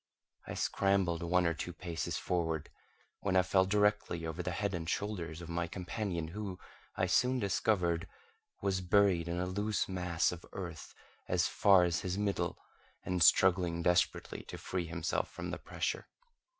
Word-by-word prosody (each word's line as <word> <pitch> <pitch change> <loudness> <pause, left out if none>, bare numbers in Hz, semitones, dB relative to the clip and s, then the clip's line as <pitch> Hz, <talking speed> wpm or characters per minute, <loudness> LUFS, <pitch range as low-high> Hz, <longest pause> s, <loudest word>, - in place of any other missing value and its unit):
I - - -5
scrambled 95 -4 +1
one 90 +1 +2
or 85 - +2
two 85 +2 -5
paces 85 -1 -3
forward, 80 -3 -1 0.5
when 95 -2 -1
I 90 - +6
fell 95 +2 +3
directly 105 -4 +1
over 80 +2 -3
the 90 - -3
head 100 +3 -1
and 85 -1 -3
shoulders 85 -6 -3
of - - -8
my 85 0 -1
companion, 90 -2 -3
who, 100 0 -5 0.4
I - - +1
soon 125 +1 +3
discovered, 95 -5 +1 0.6
was 95 -1 +1
buried 90 -2 +3
in 85 +1 -2
a 90 - 0
loose 105 +3 -1
mass 90 -3 0
of 90 -1 -8
earth 85 -4 -7 0.3
as 90 +1 +2
far 95 -3 +5
as 85 0 +1
his 90 +1 -3
middle, 100 -1 -1 0.5
and 90 -1 -1
struggling 85 +1 +4
desperately 90 0 +1
to - - -7
free 90 -2 -3
himself 85 0 -1
from - - -6
the - - -4
pressure. - - -3
90 Hz, 165 wpm, -33 LUFS, 85-100 Hz, 0.6 s, I